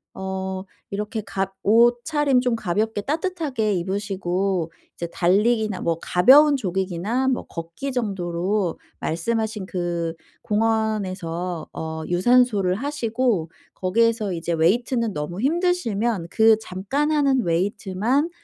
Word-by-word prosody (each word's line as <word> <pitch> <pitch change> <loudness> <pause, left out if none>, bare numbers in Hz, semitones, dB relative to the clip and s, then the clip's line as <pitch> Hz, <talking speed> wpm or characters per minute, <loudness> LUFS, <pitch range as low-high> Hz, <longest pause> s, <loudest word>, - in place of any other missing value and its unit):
어 190 0 -4 0.3
이렇게 210 +2 -3
가 195 -1 -3
옷차림 245 +5 +3
좀 250 -2 +1
가볍게 215 +1 -1
따뜻하게 295 - -1
입으시고 190 -1 -1 0.2
이제 170 - -4
달리기나 210 +3 +2
뭐 165 -1 0
가벼운 280 +11 +6
조깅이나 190 +4 -1
뭐 255 - -1
걷기 165 +11 -6
정도로 190 -4 -1 0.2
말씀하신 220 +4 -2
그 170 -2 -2 0.3
공원에서 195 -6 -1
어 160 0 -5
유산소를 200 0 +3
하시고 235 - -1 0.2
거기에서 215 +1 +1
이제 170 0 -3
웨이트는 225 +7 +1
너무 160 +5 -4
힘드시면 240 - 0
그 220 -1 +5
잠깐 220 +12 -2
하는 280 -4 +3
웨이트만 200 - 0
210 Hz, 265 characters per minute, -23 LUFS, 180-240 Hz, 0.3 s, 가벼운